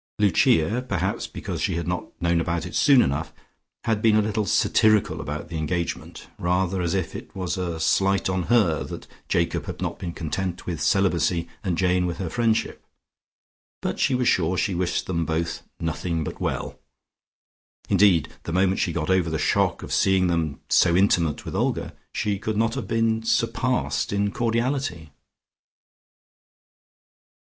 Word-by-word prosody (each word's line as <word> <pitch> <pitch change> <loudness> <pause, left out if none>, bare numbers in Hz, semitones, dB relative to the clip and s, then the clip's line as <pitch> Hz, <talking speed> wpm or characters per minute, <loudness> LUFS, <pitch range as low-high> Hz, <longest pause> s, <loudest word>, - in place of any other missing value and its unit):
Lucia 100 +1 +3
(perhaps 95 -1 -1
because - - -5
she - - 0
had 85 0 -3
not 90 0 -2
known 85 -1 +2
about 85 +1 -2
it 90 - -7
soon 140 -4 +5
enough) 80 +4 -2 0.5
had 110 -2 0
been 110 -1 +4
a 110 - +5
little 105 -1 -1
satirical 110 0 +3
about 75 +2 -5
the 80 - -4
engagement, 85 +2 -3
rather 90 +1 0
as 85 +1 0
if 95 -3 -2
it - - -9
was 90 -1 -2
a 85 -3 -3
slight 95 +4 +2
on 95 0 0
her 100 -11 +3
that - - -8 0.2
Jacob - - 0
had - - -6
not - - -3
been 85 - -4
content 90 +3 -4
with 85 -3 -4
celibacy 85 -1 +2 0.2
and 90 -5 -1
Jane 90 -1 +2
with 85 -1 -3
her 90 -3 -4
friendship, 115 -2 0 1.0
but - - -3
she 135 - +2
was 125 -1 +1
sure 90 -6 +2
she 100 - 0
wished 90 0 -1
them 85 -2 -1
both 80 +1 -2 0.2
"nothing 80 0 -2
but - - -6
well." - - -3 1.1
Indeed 95 -5 +4
the - - -6
moment 95 +2 +2
she 85 - +1
got 80 +1 -1
over 90 -3 +2
the 80 - -1
shock 75 - +1
of - - -5
seeing 95 -1 +3
them 85 -4 -1
so 85 -1 +4
intimate 85 -5 +2
with - - -6
Olga, - - -1 0.2
she 100 -2 -1
could 110 0 -2
not 115 +1 +2
have 135 -1 -4
been 115 0 +1
surpassed 115 +2 0
in 100 0 0
cordiality. 115 - -1
90 Hz, 165 wpm, -24 LUFS, 85-105 Hz, 1.1 s, soon